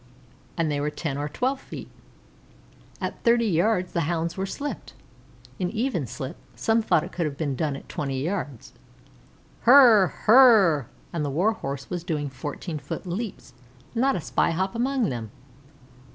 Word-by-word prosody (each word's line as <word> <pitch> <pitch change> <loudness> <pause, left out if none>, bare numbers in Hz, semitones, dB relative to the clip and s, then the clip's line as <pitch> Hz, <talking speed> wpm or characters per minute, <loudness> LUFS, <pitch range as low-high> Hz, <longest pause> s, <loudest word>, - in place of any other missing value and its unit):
and 165 -2 +1
they 145 - -1
were 145 +1 0
ten 150 -2 -4
or 145 +1 -3
twelve 260 - -1
feet. - - -9 1.1
At - - -5
thirty 235 0 +4
yards 185 0 +1
the 170 -3 0
Hounds 170 -1 -1
were 190 0 -2
slipped 285 +7 -6 0.6
an 180 - 0
even 220 - -1
slip; 130 +6 -6 0.2
some 225 0 +2
thought 165 -7 +2
it - - -8
could 170 -3 -1
have 140 -2 -6
been 145 -4 -2
done 150 0 -1
at - - -10
twenty 135 -2 -3
yards. 155 - -4 0.9
"Hrrrrrr! 235 - +8
Hrrrrrrr!" 215 - +7 0.3
and 165 -3 -1
the 145 - -1
Warhorse 150 -4 -1
was 175 -2 -3
doing 150 -5 -2
fourteen 145 +5 -5
foot - - -6
leaps, 195 +4 -5 0.4
not 255 +2 +2
a 180 - -2
spy 130 -2 +1
hop 190 +3 -1
among 250 -1 0
them. 115 -3 -5
170 Hz, 160 wpm, -25 LUFS, 145-225 Hz, 1.1 s, Hrrrrrr